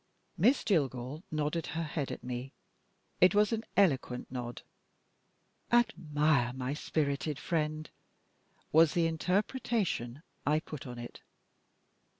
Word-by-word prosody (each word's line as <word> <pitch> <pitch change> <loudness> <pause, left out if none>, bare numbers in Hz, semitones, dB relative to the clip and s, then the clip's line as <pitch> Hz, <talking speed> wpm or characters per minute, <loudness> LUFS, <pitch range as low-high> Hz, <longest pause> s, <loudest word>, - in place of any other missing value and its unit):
Miss 230 - +4
Jillgall 140 - 0
nodded 155 +1 -1
her 165 - 0
head 150 -3 -3
at - - -6
me. 125 +1 -5 0.7
It 180 +2 +6
was 210 +2 +4
an 225 0 -1
eloquent 135 -10 +2
nod. 120 -2 -5 1.1
"Admire 150 - +2
my 130 +1 -3
spirited 150 -1 -1
friend," 155 -2 -1 0.8
was 160 +2 +5
the 170 -1 +3
interpretation 180 - -1 0.2
I 150 +1 +3
put 150 -4 -8
on 120 -1 -7
it. 120 0 -8
155 Hz, 115 wpm, -32 LUFS, 130-175 Hz, 1.1 s, It